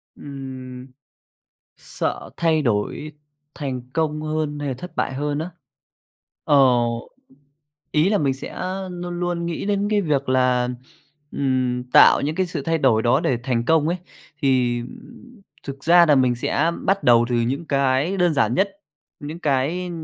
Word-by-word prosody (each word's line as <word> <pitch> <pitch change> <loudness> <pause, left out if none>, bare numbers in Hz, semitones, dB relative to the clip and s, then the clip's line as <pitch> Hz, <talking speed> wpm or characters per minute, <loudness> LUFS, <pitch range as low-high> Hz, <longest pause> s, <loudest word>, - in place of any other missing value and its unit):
Ừm, 130 -2 -9 0.9
sợ - - -4
thay 160 -2 +2
đổi 120 +6 -2 0.4
thành 135 -4 -4
công 155 -1 -1
hơn 155 -1 -2
hay 145 -1 -3
là 130 - -2
thất 180 +4 -10
bại - - -1
hơn 145 +1 -2
á? 165 +3 -4 0.9
Ờ, 145 - +3 1.3
ý 155 +4 +3
là 205 0 +2
mình 135 -3 +1
sẽ 135 - -7 0.3
luôn 175 0 -5
luôn 175 -1 -2
nghĩ 170 -1 -4
đến 205 0 0
cái 210 -1 +2
việc 145 -7 -1
là, 125 -1 +2 0.6
ừm, 130 -2 0
tạo - - +7
những 150 +2 -2
cái 185 +1 0
sự 165 -5 -5
thay 165 +1 0
đổi 120 -6 +3
đó 120 - +3
để 125 - 0
thành 120 -2 -1
công 160 +2 +3
ấy, 175 - 0 0.5
thì 125 -3 +2 0.8
thực 140 0 -8
ra 175 +1 +6
là 150 - +5
mình 130 -2 +3
sẽ 150 +6 0
bắt 195 +1 +1
đầu 120 -1 +5
từ 120 - 0
những 125 +7 -1
cái 140 +5 +1
đơn 175 -4 +2
giản 120 -4 +2
nhất, 195 +5 +1 0.5
những 150 +3 -7
cái 155 +5 -1
145 Hz, 160 wpm, -22 LUFS, 130-165 Hz, 1.3 s, tạo